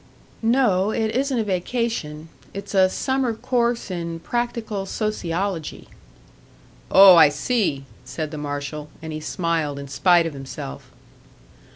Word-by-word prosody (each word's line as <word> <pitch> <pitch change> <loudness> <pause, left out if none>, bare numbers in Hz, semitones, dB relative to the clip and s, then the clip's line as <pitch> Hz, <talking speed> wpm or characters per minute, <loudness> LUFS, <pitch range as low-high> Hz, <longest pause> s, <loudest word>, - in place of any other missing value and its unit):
"No, 225 -5 +2
it 220 0 -1
isn't 270 0 0
a 225 - +1
vacation; 185 -6 -3 0.3
it's 200 - -7
a 190 -1 +5
summer 260 +2 -1
course 235 -2 -1
in 170 -2 -4
practical 225 -2 -3
sociology." 190 -5 -3 1.0
"Oh, 190 -2 +9
I 155 -3 +8
see!" 150 - -1 0.2
said 150 +4 -5
the 155 - -6
marshal; 145 +1 -5
and 160 -1 -5
he 155 - -4
smiled 160 -3 -2
in 140 0 -7
spite 170 +5 +3
of 165 - -3
himself. 130 - -8
180 Hz, 130 wpm, -22 LUFS, 150-225 Hz, 1.0 s, Oh